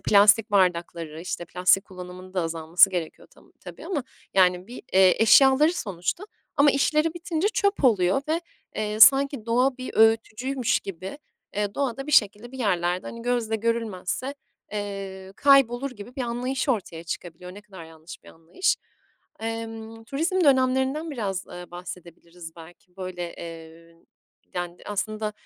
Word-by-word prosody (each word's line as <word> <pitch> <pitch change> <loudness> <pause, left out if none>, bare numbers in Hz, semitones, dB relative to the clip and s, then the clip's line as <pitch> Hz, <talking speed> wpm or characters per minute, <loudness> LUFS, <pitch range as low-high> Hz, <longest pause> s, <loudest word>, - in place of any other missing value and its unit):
plastik 210 +2 +5
bardakları, 170 -4 0
işte, 175 0 -5
plastik 180 +3 +2
kullanımının 185 0 -11
da 185 - +1
azalması 165 +3 +3
gerekiyor 170 -4 -5
tam - - -22
tabii - - -11
ama. 290 -10 -2 0.3
Yani, 180 -1 +3
bir, 245 - -10
eee, 190 +2 +5
eşyaları 270 +7 +6
sonuçta 195 - -3 0.3
ama 285 0 +6
işleri 305 +4 +1
bitince 345 +2 -1
çöp 400 -7 0
oluyor 200 +1 +3
ve, 330 +2 +1 0.4
eee, 215 0 -3
sanki 270 0 +6
doğa 250 +3 +2
bir 255 - -7
öğütücüymüş 225 +3 +2
gibi, 190 - -8 0.4
eee, 205 -1 -1
doğada 270 0 -2
bir 300 - -4
şekilde, 215 +3 +3
bir 265 - -9
yerlerde, 180 -5 0
hani, 230 0 -8
gözle 235 -2 0
görülmezse, 230 +3 -2 0.4
eee, 195 -2 -6
kaybolur 275 -1 +4
gibi 240 +2 -12
bir 260 - -2
anlayış 250 +4 -2
ortaya 175 -8 -2
çıkabiliyor. 180 +2 -7
Ne 205 - -10
kadar 190 -5 -12
yanlış 160 0 -13
bir - - -15
anlayış. 165 - -1 0.6
Emm, 225 0 -6
turizm 330 +8 0
dönemlerinden 265 +3 +2
biraz, 200 -8 -3
eee, 175 -1 -10
bahsedebiliriz 175 -1 -10
belki. 175 +3 -16
Böyle, 180 -2 -6
eee, 165 0 -11 0.6
yani, 175 0 -4
aslında, 215 +1 -3
210 Hz, 140 wpm, -25 LUFS, 180-255 Hz, 0.6 s, eşyaları